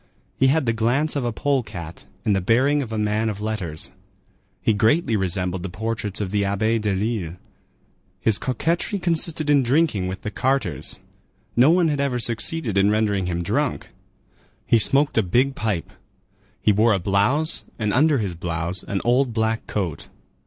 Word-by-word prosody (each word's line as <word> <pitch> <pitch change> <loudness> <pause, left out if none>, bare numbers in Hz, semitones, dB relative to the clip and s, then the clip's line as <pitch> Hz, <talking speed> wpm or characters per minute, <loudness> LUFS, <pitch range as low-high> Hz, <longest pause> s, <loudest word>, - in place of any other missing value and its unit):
He 135 - +3
had 145 +1 +2
the 115 - +1
glance 125 +8 0
of 140 - -1
a 120 - -1
pole 140 +3 0
cat 85 -7 -9 0.2
and 105 - +3
the 95 - 0
bearing 130 +9 +2
of 120 -5 -6
a 110 - -2
man 105 +1 0
of 105 -2 -5
letters. 105 -8 -4 0.7
He 110 - +2
greatly 115 - +2
resembled 95 -2 0
the 95 - -5
portraits 105 +2 -4
of 100 -3 -3
the 105 -1 +1
Abbé 110 +3 0
Delille. 100 -3 -2 0.8
His 105 +2 +1
coquetry 165 - -1
consisted 165 -3 0
in 145 -1 +4
drinking 125 - +1
with 95 +1 -6
the 105 - -4
carters. 130 -7 -1 0.6
No 125 +5 +6
one 175 0 +4
had 145 -2 -1
ever 140 -3 0
succeeded 115 - 0
in 100 +1 +4
rendering 105 -3 +1
him 85 -1 -2
drunk. - - -1 0.8
He 115 - +4
smoked 140 +3 +3
a - - +5
big 125 +8 +1
pipe. 100 -6 -3 0.7
He 105 - +3
wore 110 +2 +3
a 100 - +1
blouse, 105 - +1
and 105 -3 -1
under 150 +2 +4
his 100 -6 -2
blouse 85 +1 -3
an 100 - -3
old 120 0 +2
black 110 0 -1
coat. 90 -8 -3
110 Hz, 175 wpm, -22 LUFS, 100-135 Hz, 0.8 s, No